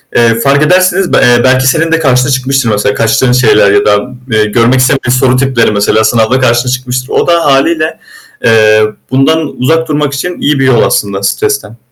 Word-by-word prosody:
eee, 115 Hz, -1 st, +2 dB
fark 140 Hz, +3 st, +1 dB
edersiniz, 185 Hz, +3 st, +1 dB
eee, 120 Hz, -5 st, +2 dB
belki 130 Hz, 0 st, +2 dB
senin 165 Hz, +3 st, 0 dB
de 165 Hz, -, +1 dB
karşına 130 Hz, -3 st, +1 dB
çıkmıştır 130 Hz, -1 st, -1 dB
mesela. 105 Hz, -1 st, -1 dB
Kaçtığın 115 Hz, +3 st, 0 dB
şeyler 125 Hz, -5 st, +2 dB
ya 100 Hz, 0 st, +1 dB
da, 105 Hz, 0 st, 0 dB, 0.2 s
eee, 110 Hz, -1 st, +1 dB
görmek 115 Hz, +4 st, +1 dB
istemeyen 130 Hz, -1 st, 0 dB
soru 130 Hz, -1 st, +1 dB
tipleri 130 Hz, -4 st, 0 dB
mesela, 105 Hz, +1 st, 0 dB
sınavda 115 Hz, +2 st, +1 dB
karşına 120 Hz, 0 st, 0 dB
çıkmıştır. 130 Hz, 0 st, -4 dB
O -, -, -1 dB
da 170 Hz, -1 st, +1 dB
hâliyle, 155 Hz, +3 st, 0 dB, 0.4 s
eee, 110 Hz, -1 st, +3 dB, 0.3 s
bundan 150 Hz, +4 st, +1 dB
uzak 160 Hz, +6 st, 0 dB
durmak 150 Hz, -2 st, -2 dB
için 175 Hz, +6 st, -5 dB
iyi 145 Hz, -1 st, 0 dB
bir 135 Hz, -, +1 dB
yol 125 Hz, -3 st, +2 dB
aslında. 100 Hz, -1 st, -2 dB
Stresten. 420 Hz, -, -3 dB
130 Hz, 180 wpm, -9 LUFS, 115-145 Hz, 0.4 s, eee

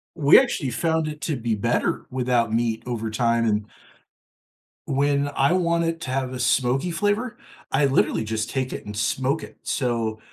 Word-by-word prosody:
We 150 Hz, -, +7 dB
actually 205 Hz, -, -1 dB
found 160 Hz, +6 st, 0 dB
it 150 Hz, 0 st, -6 dB
to 155 Hz, -, -1 dB
be 115 Hz, -2 st, -1 dB
better 115 Hz, +4 st, 0 dB
without 125 Hz, -3 st, +1 dB
meat 115 Hz, -1 st, 0 dB
over 115 Hz, -3 st, -3 dB
time, 115 Hz, +1 st, +1 dB
and 105 Hz, -1 st, 0 dB, 1.2 s
when 140 Hz, +1 st, +1 dB
I 140 Hz, +6 st, +3 dB
want 170 Hz, -2 st, +1 dB
it 165 Hz, 0 st, -2 dB
to 130 Hz, -, -4 dB
have 130 Hz, -1 st, -2 dB
a 130 Hz, -, -5 dB
smoky 130 Hz, +6 st, +1 dB
flavor, 210 Hz, +7 st, -1 dB, 0.3 s
I 140 Hz, +1 st, +3 dB
literally 110 Hz, -4 st, +1 dB
just 110 Hz, 0 st, -2 dB
take 130 Hz, -2 st, -2 dB
it -, -, -7 dB
and 105 Hz, 0 st, -7 dB
smoke 130 Hz, +7 st, 0 dB
it. -, -, -11 dB
So, 115 Hz, -4 st, -1 dB
130 Hz, 175 wpm, -24 LUFS, 115-155 Hz, 1.2 s, We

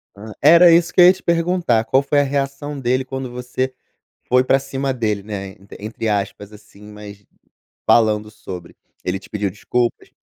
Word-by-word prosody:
Hum. 110 Hz, +2 st, -10 dB
Era 170 Hz, +4 st, +7 dB
isso 170 Hz, +1 st, +3 dB
que -, -, +5 dB
eu -, -, +9 dB
ia 180 Hz, -, +8 dB
te 190 Hz, -, -16 dB
perguntar. 170 Hz, -8 st, +1 dB
Qual 135 Hz, -, +3 dB
foi 145 Hz, +1 st, +1 dB
a -, -, +4 dB
reação 140 Hz, +1 st, -3 dB
dele 130 Hz, +1 st, 0 dB
quando 130 Hz, -1 st, -5 dB
você 125 Hz, +1 st, -3 dB, 0.5 s
foi 125 Hz, 0 st, +3 dB
pra 135 Hz, +1 st, +3 dB
cima 135 Hz, 0 st, -3 dB
dele, 105 Hz, -5 st, -2 dB
né, 100 Hz, -2 st, -6 dB
entr 100 Hz, 0 st, -14 dB
entre 110 Hz, +2 st, -5 dB
aspas 100 Hz, 0 st, -3 dB
assim, 105 Hz, -1 st, -17 dB
mas 105 Hz, -1 st, -12 dB, 0.6 s
falando 105 Hz, -2 st, +3 dB
sobre 90 Hz, -5 st, -10 dB, 0.3 s
Ele 90 Hz, +1 st, -2 dB
te 95 Hz, -, -17 dB
pediu 105 Hz, -2 st, -2 dB
desculpas? 120 Hz, +4 st, -2 dB
125 Hz, 180 wpm, -19 LUFS, 105-140 Hz, 0.6 s, eu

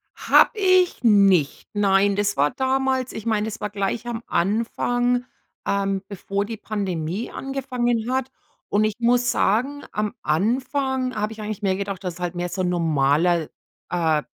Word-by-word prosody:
Habe -, -, +5 dB
ich 370 Hz, -6 st, +3 dB
nicht. 195 Hz, -, +4 dB
Nein, 200 Hz, -1 st, +3 dB
das 205 Hz, 0 st, 0 dB
war 145 Hz, +1 st, +3 dB
damals 265 Hz, -1 st, 0 dB
ich 220 Hz, -, -7 dB
meine, 215 Hz, -2 st, +1 dB
das 215 Hz, -1 st, -5 dB
war 210 Hz, -, -3 dB
gleich 205 Hz, +3 st, -2 dB
am 235 Hz, -1 st, -4 dB
Anfang, 245 Hz, +5 st, 0 dB, 0.4 s
ähm, 195 Hz, -1 st, 0 dB
bevor 200 Hz, 0 st, -3 dB
die 225 Hz, +1 st, -6 dB
Pandemie 195 Hz, -2 st, -3 dB
angefangen 250 Hz, -4 st, -2 dB
hat. 260 Hz, 0 st, -1 dB, 0.4 s
Und 205 Hz, +1 st, +2 dB
ich 215 Hz, -1 st, -1 dB
muss 245 Hz, +1 st, +3 dB
sagen, 265 Hz, +8 st, +1 dB
am 210 Hz, 0 st, -2 dB
Anfang 255 Hz, -, 0 dB
habe 210 Hz, +1 st, -2 dB
ich 220 Hz, -, -10 dB
eigentlich 210 Hz, -1 st, -5 dB
mehr 195 Hz, -2 st, +1 dB
gedacht, 195 Hz, -1 st, -4 dB
dass 180 Hz, -2 st, -4 dB
es -, -, -13 dB
halt 175 Hz, 0 st, -3 dB
mehr 175 Hz, 0 st, -2 dB
so 185 Hz, -, -3 dB
'n 180 Hz, -, +1 dB
normaler, 165 Hz, 0 st, +2 dB, 0.4 s
äh, 160 Hz, -4 st, +1 dB
210 Hz, 165 wpm, -23 LUFS, 190-245 Hz, 0.4 s, Habe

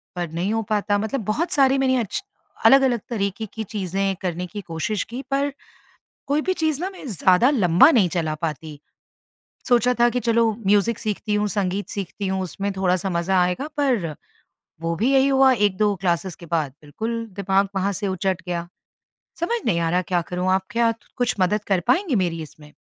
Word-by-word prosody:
पर 175 Hz, -2 st, -3 dB
नहीं 175 Hz, +6 st, -1 dB
हो 225 Hz, -, 0 dB
पाता। 205 Hz, -1 st, +1 dB
मतलब 220 Hz, +4 st, -2 dB
बहुत 305 Hz, -, -1 dB
सारी 270 Hz, -1 st, +4 dB
मैंने 260 Hz, -1 st, +2 dB
अच्छी 230 Hz, -, -3 dB, 0.4 s
अलग-अलग 265 Hz, -4 st, +5 dB
तरीके 205 Hz, -2 st, -2 dB
की 220 Hz, -, -4 dB
चीज़ें 195 Hz, -1 st, -2 dB
करने 180 Hz, -1 st, -2 dB
की 205 Hz, +3 st, -7 dB
कोशिश 180 Hz, +5 st, -2 dB
की 250 Hz, +3 st, -4 dB
पर 280 Hz, +1 st, +1 dB, 0.8 s
कोई 290 Hz, +2 st, +1 dB
भी 375 Hz, -, +2 dB
चीज़ 315 Hz, -4 st, -1 dB
ना 370 Hz, +2 st, -2 dB
मैं 370 Hz, -6 st, -11 dB
ज़्यादा 190 Hz, -, +4 dB
लम्बा 195 Hz, -, +5 dB
नहीं 225 Hz, -, +4 dB
चला 160 Hz, -3 st, -1 dB
पाती। 155 Hz, -1 st, -4 dB, 0.9 s
सोचा 245 Hz, 0 st, +4 dB
था 240 Hz, 0 st, +5 dB
कि, 250 Hz, -, -1 dB
चलो 230 Hz, -1 st, +2 dB, 0.2 s
म्यूज़िक 205 Hz, +3 st, +3 dB
सीखती 210 Hz, 0 st, -3 dB
हूँ, 210 Hz, 0 st, +1 dB
संगीत 200 Hz, 0 st, -2 dB
सीखती 200 Hz, 0 st, -4 dB
हूँ, 190 Hz, 0 st, -1 dB
उसमें 195 Hz, +3 st, -3 dB
थोड़ा-सा 185 Hz, 0 st, +1 dB
मज़ा 180 Hz, +1 st, +1 dB
आएगा 180 Hz, +11 st, 0 dB
पर, 235 Hz, -, 0 dB, 0.7 s
वो 165 Hz, 0 st, -1 dB
भी 230 Hz, +9 st, +1 dB
यही 270 Hz, 0 st, +4 dB
हुआ 270 Hz, -1 st, +5 dB
1-2 205 Hz, -2 st, +2 dB
क्लासेस 175 Hz, 0 st, -1 dB
के 170 Hz, -, -12 dB
बाद 160 Hz, -4 st, -1 dB
बिल्कुल 220 Hz, +11 st, -4 dB, 0.2 s
दिमाग 195 Hz, 0 st, +1 dB
वहाँ 195 Hz, +1 st, +1 dB
से 200 Hz, +1 st, -3 dB
उचट 190 Hz, 0 st, -1 dB
गया। 170 Hz, -1 st, -3 dB, 0.7 s
समझ 465 Hz, +8 st, 0 dB
नहीं 175 Hz, -7 st, +2 dB
आ 165 Hz, -1 st, 0 dB
रहा 180 Hz, +2 st, +2 dB
क्या 180 Hz, -1 st, 0 dB
करूँ? 180 Hz, +1 st, -1 dB
आप 190 Hz, 0 st, +1 dB
क्या 230 Hz, +1 st, +2 dB, 0.2 s
कुछ 245 Hz, -1 st, +1 dB
मदद 205 Hz, +3 st, +1 dB
कर 195 Hz, -3 st, +2 dB
पाएँगे 330 Hz, +3 st, +2 dB
मेरी 165 Hz, -2 st, -3 dB
इसमें? 150 Hz, -1 st, -14 dB
200 Hz, 185 wpm, -23 LUFS, 180-240 Hz, 0.9 s, अलग-अलग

